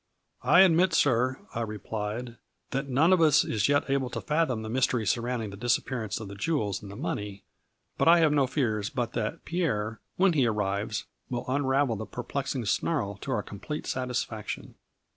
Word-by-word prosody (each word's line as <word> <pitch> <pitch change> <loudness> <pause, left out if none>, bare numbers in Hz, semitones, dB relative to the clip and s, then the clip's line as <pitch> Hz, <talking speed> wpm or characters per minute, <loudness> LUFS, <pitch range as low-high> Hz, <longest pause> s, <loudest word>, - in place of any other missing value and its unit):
" - - -46 0.2
I - - +10
admit, 180 -1 +5
sir," 130 -1 +3 0.2
I 115 - -2
replied, 110 +2 -4 0.2
" - - -45
that 135 +1 -2
none 155 +8 +4
of 180 - +4
us 155 -3 +6
is 110 +3 +1
yet 145 0 +2
able 135 -2 0
to - - -4
fathom 150 -7 0
the - - -5
mystery 125 -1 +1
surrounding 115 0 -1
the - - -8
disappearance 115 -1 -1
of 110 - -7
the 100 - -8
jewels 105 - -1
and 100 - -9
money, 105 -11 -4 0.6
but - - +3
I 170 +1 +8
have 160 -3 +4
no 140 -3 +3
fears 110 -6 0
but 120 -2 -3
that 115 +7 -3
Pierre, 115 -11 -1 0.2
when 190 -1 +4
he 135 -6 +3
arrives, 105 0 -1 0.3
will 125 -1 -3
unravel 135 -2 +1
the 110 - -6
perplexing 130 0 -3
snarl 100 -2 0
to 135 - -6
our 110 -5 0
com 100 - -10
plete 150 +7 -5
satisfaction. 125 -4 -3
125 Hz, 185 wpm, -28 LUFS, 110-145 Hz, 0.6 s, I